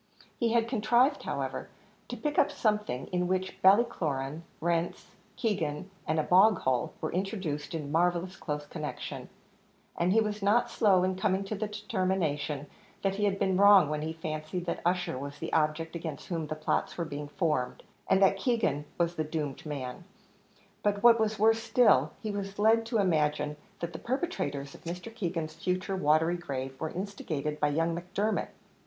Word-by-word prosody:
He 235 -2 0
had 230 -1 +3
contrived, 240 +3 +3
however, - - -4 0.4
to 245 - -5
pick 295 +6 0
up - - +4
something, 210 - 0
in 180 -1 0
which 185 +1 -2
Ballycloran, 165 - +2 0.2
rents, 170 +1 -1 0.2
Keegan, 185 -6 -2 0.2
and 155 0 +1
a - - +2
bog 195 +5 +6
hole 125 -2 0
were - - -3
introduced 180 -6 -3
in 145 -3 -4
marvellous 175 +3 +1
close 150 -2 -4
connection, 150 -6 -6 0.7
and 175 +2 +1
he 220 - +5
was 210 -1 -1
not 235 +4 +3
slow 190 -6 +4
in 185 0 +1
coming 190 0 +1
to 195 - -5
the 215 +1 -2
determination 185 -9 -1 0.4
that 195 -1 +2
he 210 - +1
had 200 -1 +1
been 190 -2 +1
wrong 200 -5 +7
when 150 0 -1
he 160 +1 -2
fancied 160 +2 -4
that 170 - -3
Ussher 175 -5 0
was 140 +1 -6
the 165 - -6
object 160 +1 +1
against 160 -3 -6
whom 165 -3 -2
plots 155 0 -1
were 170 - -1
being 145 -1 -5
formed, 150 -6 -1 0.3
and 190 +1 +5
that 195 0 +5
Keegan 195 - 0
was 170 0 +1
the 155 - +1
doomed 150 -3 -4
man; 135 0 -5 0.8
but 205 0 0
what 235 -1 +8
was 220 0 +1
worse 225 +2 +4
still, 155 - +4
he 215 - -2
was 200 -1 -5
led 225 +2 +4
to 230 - 0
imagine 150 -6 +1 0.3
that 170 0 -3
the - - -6
perpetrators 245 - -2
of - - -14
Mr. 180 +7 -6
Keegan's 170 -7 -3
future 185 +3 -2
watery 160 0 +3
grave 135 -5 -5
were 160 - -1
instigated 155 -6 -4
by 150 - +3
young 165 +3 +1
Macdermot! 185 +5 -1
180 Hz, 175 wpm, -30 LUFS, 155-205 Hz, 0.8 s, what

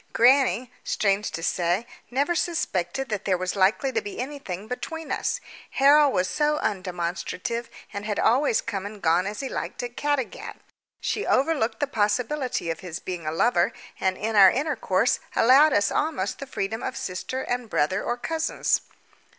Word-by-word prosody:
Grannie, 255 0 +4
strange 200 0 +1
to 165 +1 -6
say, 175 +6 0 0.2
never 280 +7 +1
suspected 270 - -1
that 210 -2 -3
there 190 -2 +2
was 185 +2 -3
likely 200 +8 +2
to 445 - 0
be 410 -2 -7
anything 250 -8 -5
between 320 +7 -5
us. - - -1 0.3
Harold 285 +1 +5
was 180 -5 +1
so 300 +8 +1
undemonstrative, 185 +4 -3 0.3
and 200 - -4
had 210 -1 -2
always 255 -1 +3
come 200 -4 -4
and 210 0 -10
gone 170 +3 +3
as 210 +1 -4
he 270 - -3
liked - - -4
at 245 0 -6
Caddagat: 290 -4 -2 0.4
she 420 - -1
overlooked 260 -6 +1
the - - +2
possibility 245 - -1
of 165 - -5
his 175 -3 -6
being 175 -4 -6
a - - 0
lover, 175 +1 +2 0.3
and 190 -1 0
in 220 +2 -2
our 195 -2 +9
intercourse 250 -7 +1 0.2
allowed 275 +6 +6
us 205 -5 +2
almost 205 -12 -1
the 275 - -6
freedom 220 -2 -3
of 245 - -4
sister 185 +8 -4
and 245 -2 -3
brother 185 +4 +1
or 240 - -1
cousins. 320 +5 0
225 Hz, 165 wpm, -25 LUFS, 190-275 Hz, 0.4 s, our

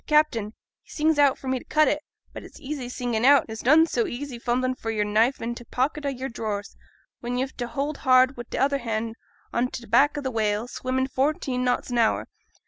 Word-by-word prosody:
T' - - -43
captain, 230 -9 +2 0.3
he - - -31
sings 310 0 +1
out 285 -2 +5
for 265 - -10
me 260 0 0
to - - -14
cut 310 0 +3
it; 300 - +1 0.3
but - - -7
it's - - -13
easy 275 -4 -5
singin' 240 -2 -2
out, 280 +1 +7
and - - -17
it's 220 - -6
noane 305 +6 +6
so 245 -7 0
easy 250 -1 -6
fumblin' 255 +2 0
for 230 -3 -6
your 215 -2 0
knife 220 +6 +2
i' 235 +1 -3
t' 240 - -9
pocket 285 +5 -1
o' - - +2
your 265 -1 -4
drawers, 215 -4 -4 0.4
when 245 +1 -3
yo've 260 +1 -2
t' 245 - -3
hold 285 +4 -3
hard 255 +1 +4
wi' 240 - -7
t' - - -4
other 280 +1 +2
hand 225 -1 -3 0.4
on 240 +1 +1
t' 245 -1 -8
back 290 +4 +3
of 285 - -4
a 260 - -1
whale, 215 0 0
swimmin' 260 +1 -2
fourteen 265 -1 -1
knots 250 0 0
an 240 - +1
hour. 225 - +2
255 Hz, 235 wpm, -25 LUFS, 235-275 Hz, 0.4 s, out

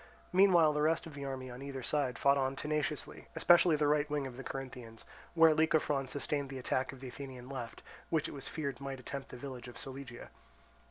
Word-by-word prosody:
Meanwhile 180 -5 +6
the 150 - 0
rest 160 +2 +2
of 165 - -9
the 140 0 -6
army 130 -2 -5
on 125 +2 -9
either 135 -2 -5
side 140 -2 0
fought 140 0 +4
on 135 -1 0
tenaciously, 150 +1 -2
especially 175 -1 +6
the 150 0 +1
right 150 0 +2
wing 145 -2 -1
of 130 -2 -6
the 135 - -7
Corinthians, 125 -5 -7 0.3
where 165 -1 +7
Lycophron 155 -3 +2
sustained 140 +1 -2
the 135 - -6
attack 130 +1 -1
of 135 -1 -12
the 130 - -6
Athenian 130 -2 -8
left, 130 -4 -6 0.3
which 160 -2 +1
it - - -7
was 140 - -6
feared 140 -5 -4
might 135 -1 -5
attempt 135 +2 -6
the - - -8
village 125 -2 -7
of 120 - -10
Solygia. 135 -2 -7
140 Hz, 210 wpm, -33 LUFS, 130-150 Hz, 0.3 s, where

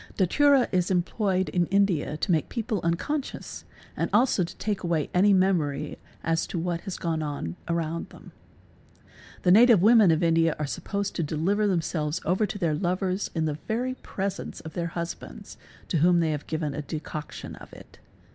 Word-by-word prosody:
Datura 270 - +4
is 180 -2 +1
employed 185 +1 0
in 175 -2 +1
India 190 -7 +1
to 180 - -1
make 160 -3 +1
people 225 -5 -2
unconscious 255 - -3 0.3
and - - -1
also 240 -6 +3
to 170 +2 -6
x - - -10
ake 205 -3 -1
away 165 -4 -1
any 195 +3 +5
memory 165 -7 +1 0.2
as 165 0 0
to - - -4
what 170 0 -2
has 195 -3 -6
gone 165 -2 -2
on 145 - -4
around 170 -1 -2
them. - - -14 1.1
+The 180 - +4
native 230 +1 +7
women 220 -3 +7
of 160 +1 +2
India 165 -1 +3
are 150 - -2
supposed 200 +6 -3
to - - 0
deliver 170 +7 0
themselves 165 -3 -1
over 185 +6 +2
Bes - - -6
their 170 -6 0
lovers 185 +3 -1
in 160 -1 +1
the 150 -1 -2
very 245 +4 -1
presence 200 -6 -5
of 160 - -9
their 170 -1 -2
husbands 170 0 -7 0.3
to 170 - +1
whom 175 +3 +4
they 160 -2 +1
have 150 -1 -4
Bo: 160 - -2
yen 150 -3 -2
a 150 - -3
decoction 150 0 -6
of - - -13
it. - - -15
175 Hz, 185 wpm, -26 LUFS, 160-200 Hz, 1.1 s, native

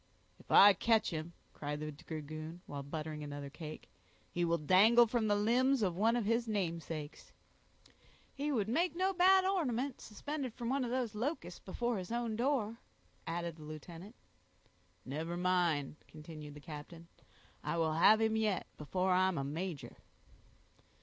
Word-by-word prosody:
"If - - -19
I 205 +1 +9
catch 220 +3 +2
him," 160 +1 -5 0.2
cried 145 0 -4
the 155 0 -4
dragoon, 155 +2 -7
while 140 -1 -6
buttering 150 +1 -5
another 145 -1 -6
cake, 155 0 -8 0.4
"he 175 - -1
will 170 0 +2
dangle 200 +9 +6
from 230 -1 0
the 205 - +3
limbs 245 +4 +3
of 180 -4 0
one 225 +5 +3
of 240 -3 0
his 230 +2 +1
namesakes." 165 -7 -4 1.0
"He 290 +2 -2
would 215 -7 0
make 335 +10 +1
no 380 +2 +1
bad 375 +1 +5
ornament, 280 -9 -1
suspended 265 +2 -5
from 235 -1 -4
one 270 0 +1
of 245 - -2
those 245 -3 -1
locusts 225 - -3
before 235 +3 -2
his 185 +3 -7
own 235 -2 -1
door," 235 -3 0 0.5
added 170 0 -3
the 155 - -11
lieutenant. 165 - -9 0.9
"Never 160 +6 -4
mind," 175 -6 +1
continued 155 -1 -10
the 150 - -11
captain; 165 +3 -9 0.6
"I 170 - -2
will 160 -1 +1
have 205 +7 +6
him 220 0 +2
yet 215 -4 0
before 185 +5 0
I'm 185 -1 +3
a 135 - -1
major." 160 +2 -5
185 Hz, 155 wpm, -34 LUFS, 155-235 Hz, 1.0 s, I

